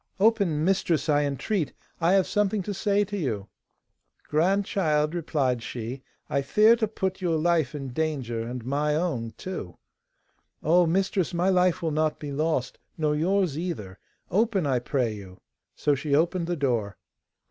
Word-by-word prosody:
'Open, 195 Hz, -8 st, +3 dB
mistress, 170 Hz, -6 st, +1 dB
I 145 Hz, -1 st, +3 dB
entreat, 145 Hz, +4 st, -1 dB, 0.3 s
I 170 Hz, +2 st, +3 dB
have 195 Hz, -2 st, +4 dB
something 210 Hz, -1 st, 0 dB
to 205 Hz, -, -3 dB
say 205 Hz, +1 st, +1 dB
to 205 Hz, +1 st, -6 dB
you.' 115 Hz, -, -3 dB, 0.8 s
'Grandchild,' 160 Hz, -2 st, +1 dB
replied 145 Hz, -8 st, 0 dB
she, 120 Hz, +3 st, -6 dB, 0.3 s
'I 140 Hz, -, 0 dB
fear 210 Hz, +11 st, +5 dB
to 220 Hz, -2 st, 0 dB
put 190 Hz, -2 st, -3 dB
your 170 Hz, -3 st, +1 dB
life 160 Hz, -3 st, +1 dB
in 135 Hz, -2 st, -5 dB
danger, 130 Hz, -5 st, -2 dB
and 120 Hz, +1 st, -5 dB
my 150 Hz, +3 st, 0 dB
own 135 Hz, -9 st, -2 dB
too.' 180 Hz, -, -6 dB, 0.9 s
'Oh, 170 Hz, +2 st, +4 dB
mistress, 190 Hz, 0 st, 0 dB
my 175 Hz, +3 st, +2 dB
life 180 Hz, -1 st, +2 dB
will 160 Hz, -, 0 dB
not 155 Hz, 0 st, 0 dB
be 145 Hz, -1 st, -6 dB
lost, 150 Hz, -2 st, -1 dB, 0.2 s
nor 150 Hz, -2 st, +1 dB
yours 175 Hz, -1 st, +1 dB
either; 105 Hz, -, -5 dB, 0.3 s
open, 205 Hz, -3 st, +2 dB
I 130 Hz, -3 st, +2 dB
pray 120 Hz, -2 st, -1 dB
you.' 95 Hz, -3 st, -11 dB, 0.4 s
So 145 Hz, -, +1 dB
she 140 Hz, +1 st, 0 dB
opened 170 Hz, +2 st, +1 dB
the 175 Hz, -, 0 dB
door. 120 Hz, -, -1 dB
155 Hz, 160 wpm, -26 LUFS, 135-185 Hz, 0.9 s, fear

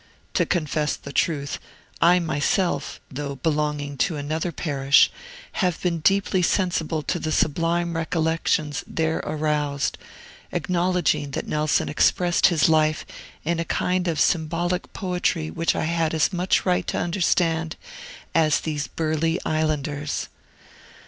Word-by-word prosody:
To -, -, +2 dB
confess 155 Hz, -3 st, 0 dB
the 140 Hz, -, -10 dB
truth, 145 Hz, -4 st, 0 dB, 0.4 s
I 175 Hz, +2 st, +6 dB
myself, 170 Hz, +2 st, 0 dB
though 140 Hz, +1 st, -4 dB
belonging 150 Hz, -1 st, -1 dB
to 165 Hz, -, +1 dB
another 155 Hz, +4 st, -2 dB
parish, 140 Hz, -4 st, +3 dB, 0.5 s
have 180 Hz, -3 st, +1 dB
been 170 Hz, -2 st, -1 dB
deeply 195 Hz, +2 st, +2 dB
sensible 170 Hz, -4 st, 0 dB
to 175 Hz, -, -1 dB
the 155 Hz, -, -3 dB
sublime 165 Hz, +3 st, +1 dB
recollections 160 Hz, -2 st, 0 dB
there 160 Hz, 0 st, -1 dB
aroused, 150 Hz, -2 st, -1 dB, 0.5 s
acknowledging 175 Hz, -5 st, 0 dB
that -, -, -3 dB
Nelson 150 Hz, -1 st, +1 dB
expressed 175 Hz, +3 st, +3 dB
his 165 Hz, -5 st, +3 dB
life 155 Hz, -1 st, +2 dB, 0.4 s
in 170 Hz, +1 st, 0 dB
a -, -, +1 dB
kind 180 Hz, +1 st, 0 dB
of 165 Hz, -2 st, 0 dB
symbolic 175 Hz, +2 st, 0 dB
poetry 180 Hz, -4 st, -1 dB
which 165 Hz, 0 st, 0 dB
I -, -, -1 dB
had 165 Hz, -1 st, 0 dB
as 160 Hz, +4 st, +2 dB
much 180 Hz, +1 st, +1 dB
right 180 Hz, -1 st, +1 dB
to -, -, -1 dB
understand 170 Hz, -2 st, +1 dB, 0.6 s
as 155 Hz, -2 st, +3 dB
these 150 Hz, -2 st, -3 dB
burly 160 Hz, +1 st, 0 dB
islanders. 150 Hz, -2 st, -1 dB
160 Hz, 130 wpm, -24 LUFS, 150-175 Hz, 0.6 s, I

